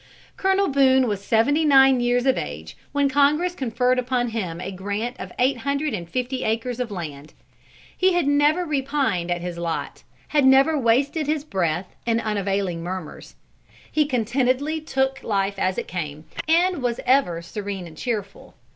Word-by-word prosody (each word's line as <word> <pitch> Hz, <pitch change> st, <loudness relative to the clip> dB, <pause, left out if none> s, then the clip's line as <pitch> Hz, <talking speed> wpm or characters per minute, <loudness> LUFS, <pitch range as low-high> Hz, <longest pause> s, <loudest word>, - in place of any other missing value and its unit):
Colonel 385 Hz, +1 st, +2 dB
Boone 265 Hz, -2 st, +4 dB
was 205 Hz, -2 st, -3 dB
seventy 270 Hz, +9 st, +2 dB
nine 270 Hz, -3 st, +6 dB
years 245 Hz, +1 st, +1 dB
of 265 Hz, -, +4 dB
age 75 Hz, +2 st, -6 dB, 0.2 s
when 285 Hz, -1 st, +2 dB
Congress 290 Hz, +6 st, +2 dB
conferred 250 Hz, -3 st, 0 dB
upon 250 Hz, -1 st, 0 dB
him 185 Hz, -7 st, -4 dB
a 190 Hz, -, -5 dB
grant 205 Hz, +6 st, -4 dB
of -, -, -7 dB
eight 260 Hz, +1 st, +2 dB
hundred 280 Hz, +3 st, -2 dB
and 170 Hz, -5 st, -5 dB
fifty 255 Hz, +2 st, -2 dB
acres 230 Hz, +3 st, -2 dB
of 250 Hz, -2 st, -2 dB
land. 155 Hz, -6 st, -7 dB, 0.6 s
He 370 Hz, 0 st, +3 dB
had 350 Hz, -3 st, +1 dB
never 295 Hz, +5 st, +3 dB
repined 270 Hz, -, -1 dB
at 175 Hz, 0 st, -1 dB
his 175 Hz, -1 st, -5 dB
lot, 170 Hz, -1 st, -4 dB, 0.3 s
had 295 Hz, -2 st, +3 dB
never 270 Hz, +4 st, +5 dB
wasted 275 Hz, +4 st, +1 dB
his 305 Hz, -1 st, 0 dB
breath 180 Hz, -, -2 dB
in 230 Hz, 0 st, +2 dB
unavailing 200 Hz, -5 st, -1 dB
murmurs. 180 Hz, -1 st, -7 dB, 0.6 s
He 305 Hz, -2 st, +2 dB
contentedly 260 Hz, +5 st, 0 dB
took 265 Hz, -3 st, -1 dB
life 200 Hz, -2 st, -1 dB
as 185 Hz, 0 st, 0 dB
it -, -, -3 dB
came, 155 Hz, -3 st, -5 dB, 0.2 s
and 345 Hz, 0 st, +3 dB
was 240 Hz, -1 st, -1 dB
ever 245 Hz, -11 st, +2 dB
serene 195 Hz, 0 st, -5 dB
and 165 Hz, -2 st, -12 dB
cheerful. 205 Hz, 0 st, -5 dB
245 Hz, 165 wpm, -23 LUFS, 195-280 Hz, 0.6 s, nine